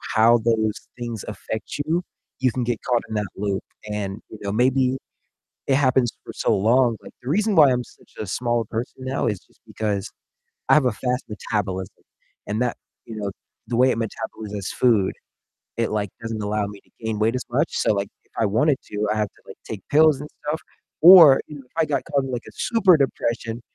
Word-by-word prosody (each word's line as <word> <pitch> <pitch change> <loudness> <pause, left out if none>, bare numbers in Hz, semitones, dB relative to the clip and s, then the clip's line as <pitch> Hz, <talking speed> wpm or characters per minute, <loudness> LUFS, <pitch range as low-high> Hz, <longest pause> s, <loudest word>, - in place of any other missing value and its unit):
how 115 +2 +6
those 110 -2 0
things 120 -3 -4
affect 110 +1 -5
you, 170 +3 0 0.4
you 130 -1 +2
can 125 +2 -2
get 120 -2 -2
caught 120 -2 +1
in 110 - -4
that 105 -1 -1
loop, 100 -1 -2 0.3
and, 105 0 -4
you 110 - -10
know, 100 - -2
maybe 130 +3 +2 0.7
it 135 - +3
happens 130 -3 +3
for - - -8
so - - +1
long 120 +4 +3
like, - - -12
the 125 - -7
reason 210 +4 +2
why 150 -4 +8
I'm 125 0 0
such - - -21
a 110 - -4
small 120 +3 -1
person 125 +3 -5
now 130 +1 -1
is 105 -5 -1
just - - -30
because 105 -3 -2 0.6
I - - +7
have 150 -3 +4
a 125 - +3
fast 125 +4 -2
metabolism 95 -3 -3 0.4
and 105 +3 -1
that 125 -1 0 0.3
you 115 - -8
know, 100 -2 -3 0.4
the 120 - -2
way 130 +2 +5
it - - -1
metabolizes 105 -3 -5
food, 110 -7 +3 0.7
it, 115 - +1
like, 105 -1 -1
doesn't 115 -1 -4
allow 105 0 0
me 100 0 -9
to - - -33
gain 110 -2 -2
weight 110 +3 +2
as 125 - -4
much, 145 +7 +2
so, - - +3
like, 100 0 -2 0.2
if - - -37
I 110 - +3
wanted 130 +8 +2
to, 105 0 -2
I - - -2
have 105 -1 +1
to, - - -28
like, - - -11
take 105 -4 -7
pills 150 -1 +5
and 150 - -7 0.2
stuff, 155 +2 0 0.4
or, 165 -6 +10
you 150 - -9
know, 135 - -11
if - - -35
I 165 - +3
got 145 -2 0
caught 140 -3 +2
in, 135 - -5
like, 120 -1 -3
a - - -12
super 195 -7 +4
depression, 115 -4 -1
115 Hz, 210 wpm, -23 LUFS, 105-130 Hz, 0.7 s, or